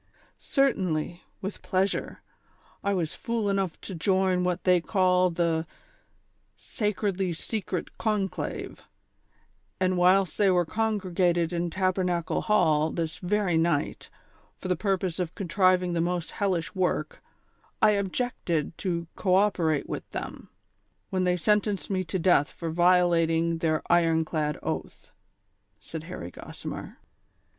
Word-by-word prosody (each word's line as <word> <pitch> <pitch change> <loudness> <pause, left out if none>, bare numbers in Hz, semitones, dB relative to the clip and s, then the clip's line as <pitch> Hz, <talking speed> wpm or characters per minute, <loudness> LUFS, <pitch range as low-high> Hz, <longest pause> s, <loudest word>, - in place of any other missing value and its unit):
" - - -38
Certainly, 180 - 0 0.2
with 195 +1 -5
pleasure; 190 +1 -1 0.6
I 200 - +1
was 165 -4 -1
fool 225 -3 -1
enough 195 -4 -1
to 195 - -7
join 185 +1 +2
what 180 0 -1
they 180 -2 +4
call 185 -1 +3
the 165 -1 0 0.5
' - - -43 0.2
Sacredly 195 -4 0
Secret 185 0 -4
Conclave,' 210 -4 -2 1.0
and 185 -1 +1
whilst 185 -1 +3
they 200 -2 +5
were 180 -1 +3
congregated 180 -5 0
at 170 0 -1
Tabernacle 180 -2 0
Hall 160 -7 +3
this 165 -1 -3
very 185 -2 +1
night, 165 -3 0 0.5
for - - -6
the 180 - +3
purpose 185 -2 -1
of 180 -1 -3
contriving 185 -1 +2
the 170 - +1
most 175 -1 -1
hellish 185 -6 -1
work, 190 - -1 0.6
I 210 -1 +5
ob 200 -2 -1
jected 170 - -2
to 170 -3 -2
co 185 -2 +2
operate 175 -7 +2
with - - -5
tliem, - - -6 0.6
when 185 -1 +1
they 180 0 +2
sentenced 210 +2 +1
me 185 -1 0
to 190 - -2
death 175 -5 +3
for 165 -2 -5
violating 170 -1 +3
their 155 -1 0
iron 165 -2 +3
clad 150 -2 -1
oath," - - -5 0.7
said 160 -1 -8
Harry 130 - -7
Gossimer. - - -8
180 Hz, 135 wpm, -27 LUFS, 170-195 Hz, 1.0 s, they